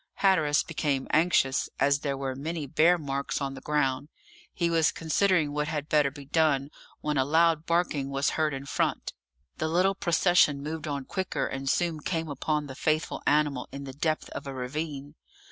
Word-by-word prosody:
Hatteras 160 Hz, -7 st, +3 dB
became 145 Hz, -4 st, -2 dB
anxious, 155 Hz, -5 st, +2 dB
as 140 Hz, 0 st, +3 dB
there 140 Hz, -1 st, -2 dB
were 135 Hz, -1 st, -3 dB
many 155 Hz, +3 st, -4 dB
bear 165 Hz, +6 st, +4 dB
marks 140 Hz, -3 st, -3 dB
on 135 Hz, -1 st, -3 dB
the 135 Hz, -, -9 dB
ground; 145 Hz, -1 st, 0 dB, 0.4 s
he 170 Hz, -, 0 dB
was 165 Hz, -2 st, +3 dB
considering 165 Hz, -1 st, +1 dB
what 150 Hz, 0 st, -1 dB
had 150 Hz, -2 st, -3 dB
better 150 Hz, -2 st, +3 dB
be 140 Hz, 0 st, -11 dB
done, 145 Hz, -2 st, +1 dB, 0.3 s
when 150 Hz, -2 st, 0 dB
a -, -, +4 dB
loud 160 Hz, +2 st, +2 dB
barking 165 Hz, -5 st, 0 dB
was 140 Hz, +1 st, 0 dB
heard 155 Hz, -1 st, 0 dB
in 135 Hz, 0 st, -5 dB
front. -, -, -1 dB, 0.5 s
The -, -, 0 dB
little 180 Hz, +4 st, +2 dB
procession 170 Hz, -5 st, +3 dB
moved 155 Hz, +1 st, -5 dB
on 140 Hz, -2 st, -3 dB
quicker, 190 Hz, +4 st, -2 dB
and 135 Hz, 0 st, -3 dB
soon 170 Hz, -1 st, 0 dB
came 165 Hz, +1 st, -3 dB
upon 150 Hz, +2 st, -1 dB
the 135 Hz, -, -8 dB
faithful 155 Hz, +3 st, -1 dB
animal 145 Hz, -3 st, +1 dB
in 140 Hz, 0 st, -7 dB
the 135 Hz, -1 st, -7 dB
depth 155 Hz, +3 st, -1 dB
of -, -, -7 dB
a 135 Hz, -, -5 dB
ravine. 145 Hz, +2 st, -5 dB
150 Hz, 180 wpm, -28 LUFS, 140-160 Hz, 0.5 s, bear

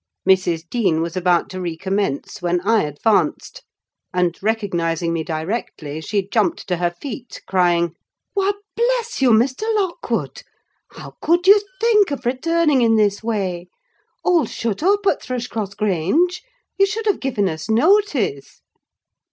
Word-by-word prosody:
Mrs. 175 Hz, -3 st, +2 dB
Dean 185 Hz, -6 st, +1 dB
was 165 Hz, +1 st, -3 dB
about 180 Hz, -2 st, +2 dB
to 185 Hz, 0 st, -5 dB
recommence, 180 Hz, -1 st, -3 dB
when 175 Hz, 0 st, +1 dB
I 220 Hz, +3 st, +3 dB
advanced; 150 Hz, +9 st, 0 dB, 0.5 s
and 180 Hz, -2 st, +1 dB
recognising 175 Hz, -6 st, -1 dB
me 165 Hz, -1 st, -1 dB
directly, 160 Hz, -2 st, -4 dB
she 200 Hz, +2 st, -2 dB
jumped 335 Hz, -, 0 dB
to 180 Hz, -, 0 dB
her 175 Hz, 0 st, +1 dB
feet, 245 Hz, +7 st, -8 dB
crying—"Why, 180 Hz, -, -1 dB, 0.2 s
bless 475 Hz, -, 0 dB
you, 260 Hz, -, +5 dB
Mr. 240 Hz, -, +3 dB
Lockwood! 380 Hz, -5 st, -2 dB, 0.5 s
How -, -, -11 dB
could 345 Hz, +2 st, +2 dB
you 405 Hz, +2 st, +7 dB, 0.2 s
think 430 Hz, -4 st, +4 dB
of 280 Hz, -3 st, -5 dB
returning 300 Hz, +2 st, +2 dB
in 225 Hz, -1 st, +4 dB
this 205 Hz, -2 st, +2 dB
way? 190 Hz, -6 st, -2 dB, 0.6 s
All's 345 Hz, -4 st, +2 dB
shut 225 Hz, -1 st, -3 dB
up 400 Hz, +4 st, +2 dB
at -, -, +2 dB
Thrushcross 230 Hz, -5 st, -4 dB
Grange. 210 Hz, -, +1 dB, 0.4 s
You 395 Hz, -, +5 dB
should 435 Hz, +2 st, -4 dB
have 415 Hz, -3 st, +1 dB
given 235 Hz, -7 st, 0 dB
us 160 Hz, +5 st, -5 dB
notice!" 260 Hz, -, +1 dB
215 Hz, 135 wpm, -20 LUFS, -, 0.6 s, you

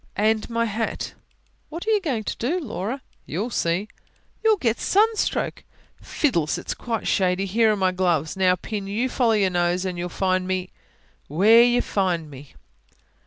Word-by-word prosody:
"And 215 Hz, +2 st, +1 dB
my 230 Hz, 0 st, 0 dB
hat." 225 Hz, +1 st, -3 dB, 0.6 s
"What 335 Hz, +5 st, -6 dB
are -, -, +3 dB
you 425 Hz, -2 st, +3 dB
going 260 Hz, -, -2 dB
to -, -, -3 dB
do, 305 Hz, +10 st, -1 dB
Laura?" 245 Hz, -, -4 dB, 0.2 s
"You'll 210 Hz, +10 st, -3 dB
see." 175 Hz, +3 st, 0 dB, 0.6 s
"You'll 440 Hz, -1 st, +4 dB
get 235 Hz, -, 0 dB
sunstroke!" 435 Hz, +2 st, +1 dB, 0.4 s
"Fiddles! 170 Hz, -, 0 dB
it's -, -, -4 dB
quite 230 Hz, -3 st, -4 dB
shady. 185 Hz, 0 st, +1 dB
Here're 215 Hz, +2 st, +3 dB
my 190 Hz, -2 st, +1 dB
gloves. 175 Hz, -5 st, 0 dB
Now, 185 Hz, -1 st, +3 dB
Pin, 200 Hz, +2 st, -5 dB
you 225 Hz, +6 st, -1 dB
follow 240 Hz, -3 st, +2 dB
your 200 Hz, -3 st, +2 dB
nose 175 Hz, +1 st, 0 dB
and 180 Hz, -2 st, -3 dB
you'll 175 Hz, +1 st, -3 dB
find 185 Hz, 0 st, 0 dB
me 185 Hz, -1 st, -2 dB, 0.6 s
WHERE 210 Hz, +10 st, +6 dB
you 245 Hz, 0 st, +2 dB
find 175 Hz, -6 st, -1 dB
me!" 140 Hz, +1 st, -13 dB
205 Hz, 165 wpm, -23 LUFS, 180-235 Hz, 0.6 s, WHERE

